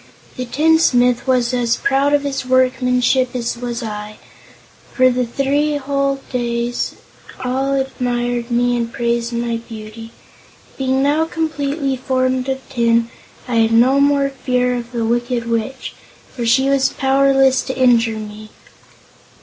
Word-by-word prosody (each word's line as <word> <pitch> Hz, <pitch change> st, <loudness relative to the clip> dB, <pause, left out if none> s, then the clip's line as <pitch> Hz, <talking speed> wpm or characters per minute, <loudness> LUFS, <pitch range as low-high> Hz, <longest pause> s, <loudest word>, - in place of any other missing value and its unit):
The 255 Hz, -, -4 dB
tinsmith 250 Hz, -3 st, +2 dB
was 250 Hz, -1 st, +1 dB
as 240 Hz, -2 st, +1 dB
proud 275 Hz, +1 st, +1 dB
of 285 Hz, -, 0 dB
his 280 Hz, -2 st, -3 dB
workmanship 255 Hz, 0 st, +1 dB
as 240 Hz, -1 st, -2 dB
I -, -, -13 dB
was, 240 Hz, 0 st, -4 dB
and 210 Hz, -1 st, -6 dB, 0.8 s
for 255 Hz, -1 st, +4 dB, 0.2 s
three 280 Hz, +5 st, 0 dB
whole 275 Hz, -1 st, -1 dB
days, 240 Hz, -1 st, -2 dB, 0.5 s
all 265 Hz, +2 st, -1 dB
admired 245 Hz, -2 st, -2 dB
me 245 Hz, 0 st, +1 dB
and 235 Hz, -1 st, -2 dB
praised 235 Hz, 0 st, -1 dB
my 235 Hz, 0 st, -2 dB
beauty. 225 Hz, 0 st, -10 dB, 0.7 s
Being 265 Hz, 0 st, 0 dB
now 300 Hz, +3 st, +2 dB
completely 295 Hz, -4 st, -2 dB
formed 255 Hz, 0 st, -1 dB
of 265 Hz, 0 st, -4 dB
tin, 235 Hz, -2 st, +1 dB, 0.4 s
I 240 Hz, -2 st, -1 dB
had 225 Hz, 0 st, +3 dB
no 255 Hz, +4 st, +4 dB
more 280 Hz, 0 st, +3 dB
fear 250 Hz, -2 st, -1 dB
of 240 Hz, 0 st, -6 dB
the 235 Hz, -2 st, -2 dB
Wicked 240 Hz, 0 st, -1 dB
Witch, 230 Hz, +3 st, -3 dB, 0.4 s
for 240 Hz, -2 st, -3 dB
she 265 Hz, +3 st, +3 dB
was 275 Hz, -1 st, +2 dB
powerless 270 Hz, -1 st, +3 dB
to 260 Hz, -, -4 dB
injure 235 Hz, -3 st, +3 dB
me. 215 Hz, 0 st, -9 dB
250 Hz, 140 wpm, -18 LUFS, 235-270 Hz, 0.8 s, for